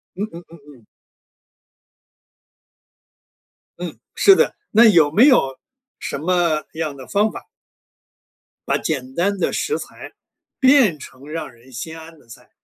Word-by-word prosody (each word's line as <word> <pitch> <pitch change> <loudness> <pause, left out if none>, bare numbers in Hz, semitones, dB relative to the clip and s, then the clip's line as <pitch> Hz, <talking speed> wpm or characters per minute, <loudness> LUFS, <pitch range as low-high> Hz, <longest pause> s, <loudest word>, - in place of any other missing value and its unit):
嗯 200 - -3
嗯 170 +1 -9
嗯 170 - -15 0.2
嗯。 115 -4 -22 2.9
嗯， 175 -1 -7 0.2
是 390 - +6
的。 475 - +1 0.2
那 230 +2 +6
有 165 -9 +5
没 225 - +6
有 135 - +3 0.4
什 - - -4
么 170 -1 0
样 155 -3 -4
的 130 -2 -12
方 210 +2 +1
法？ - - -10 1.2
把 - - +1
简 130 -4 -4
单 200 +3 0
的 - - 0
食 445 - -1
材 - - -10 0.5
变 260 - +4
成 130 +2 -13
让 160 -3 -6
人 120 +3 -20
心 160 +7 -7
安 160 0 -13
的 - - -24
菜， 115 - -15
165 Hz, 145 characters per minute, -20 LUFS, 140-205 Hz, 2.9 s, 是